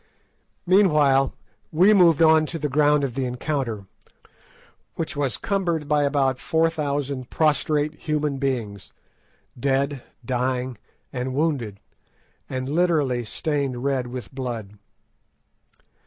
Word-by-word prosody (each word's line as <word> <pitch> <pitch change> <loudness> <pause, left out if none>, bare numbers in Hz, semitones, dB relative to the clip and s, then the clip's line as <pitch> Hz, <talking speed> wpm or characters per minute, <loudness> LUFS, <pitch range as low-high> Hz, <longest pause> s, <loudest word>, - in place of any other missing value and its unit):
Meanwhile 150 -8 +4 0.4
we 185 +7 +5
moved 170 -5 +5
on 160 -1 +5
to 165 - -4
the 150 -1 -2
ground 145 +1 +3
of 135 -3 -2
the 135 +1 -2
encounter, 125 -4 -3 1.1
which 160 - -4
was 140 -3 -1
cumbered 170 -7 -1
by 150 0 +2
about 135 -2 +1
four 165 0 +1
thousand 140 -4 -3
prostrate 150 -1 +1
human 150 -3 -2
beings, 115 -8 -3 0.7
dead, 140 +1 0 0.2
dying, 125 0 -2 0.3
and 130 +1 -3
wounded, 135 -10 -1 0.7
and 130 0 -3
literally 150 -6 +1
stained 135 +1 -2
red 135 -3 0
with 125 +2 -7
blood. 115 -6 -5
140 Hz, 110 wpm, -23 LUFS, 130-155 Hz, 1.1 s, we